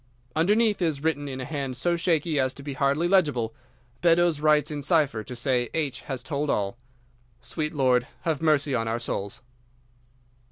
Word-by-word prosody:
"Underneath 210 Hz, +6 st, +3 dB
is 155 Hz, -5 st, 0 dB
written 145 Hz, -3 st, 0 dB
in 130 Hz, -1 st, -5 dB
a 130 Hz, -, -4 dB
hand 135 Hz, -3 st, -4 dB
so 175 Hz, +3 st, +1 dB
shaky 165 Hz, -3 st, +1 dB
as 130 Hz, 0 st, 0 dB
to 140 Hz, -, -10 dB
be 140 Hz, -1 st, -4 dB
hardly 140 Hz, +5 st, +1 dB
legible, 145 Hz, -, +2 dB, 0.5 s
'Beddoes 170 Hz, -2 st, +3 dB
writes 150 Hz, -1 st, +3 dB
in 145 Hz, -1 st, -4 dB
cipher 145 Hz, -7 st, +1 dB
to 125 Hz, -, -8 dB
say 125 Hz, -1 st, 0 dB
H. 145 Hz, -5 st, -1 dB
has 130 Hz, -2 st, -3 dB
told 145 Hz, 0 st, -2 dB
all. 100 Hz, +1 st, -1 dB, 0.6 s
Sweet 150 Hz, +5 st, -3 dB
Lord, 130 Hz, -3 st, +2 dB
have 160 Hz, -2 st, -1 dB
mercy 150 Hz, -3 st, +2 dB
on 115 Hz, -2 st, 0 dB
our 115 Hz, +1 st, 0 dB
souls! 100 Hz, -3 st, -4 dB
145 Hz, 170 wpm, -26 LUFS, 130-160 Hz, 0.6 s, Underneath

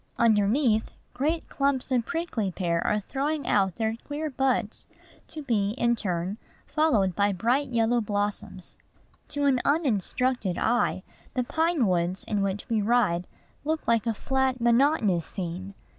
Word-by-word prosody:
Underneath, 220 Hz, +1 st, +2 dB, 0.2 s
great 300 Hz, +7 st, -1 dB
clumps 275 Hz, -1 st, -1 dB
of 245 Hz, -2 st, +1 dB
prickly 330 Hz, -, -2 dB
pear 170 Hz, -2 st, -1 dB
are 210 Hz, -, +1 dB
throwing 285 Hz, +7 st, -2 dB
out 190 Hz, -3 st, +2 dB
their 220 Hz, 0 st, -1 dB
queer 300 Hz, +1 st, -4 dB
buds, 255 Hz, -5 st, -1 dB, 0.4 s
to 310 Hz, -2 st, -8 dB
be, 210 Hz, -6 st, 0 dB
in 235 Hz, -1 st, +2 dB
turn, 185 Hz, -1 st, -3 dB, 0.3 s
followed 230 Hz, -, +2 dB
by 205 Hz, 0 st, +2 dB
bright 240 Hz, +9 st, +1 dB
yellow 235 Hz, 0 st, +2 dB
blossoms. 205 Hz, -1 st, -4 dB, 0.5 s
To 290 Hz, 0 st, -2 dB
an 260 Hz, -3 st, +3 dB
uninstructed 250 Hz, -, 0 dB
eye, 235 Hz, -5 st, +1 dB, 0.3 s
the 250 Hz, -, +1 dB
pine 320 Hz, 0 st, +1 dB
woods 180 Hz, 0 st, 0 dB
in 210 Hz, -2 st, -1 dB
which 195 Hz, 0 st, -2 dB
we 225 Hz, -2 st, +1 dB
ride 200 Hz, -6 st, +2 dB, 0.4 s
look 315 Hz, +2 st, -2 dB
like 230 Hz, 0 st, +2 dB
a 225 Hz, -, 0 dB
flat, 265 Hz, +1 st, 0 dB
monotonous 235 Hz, -, +3 dB
scene. 185 Hz, +2 st, -6 dB
230 Hz, 145 wpm, -27 LUFS, 200-270 Hz, 0.5 s, an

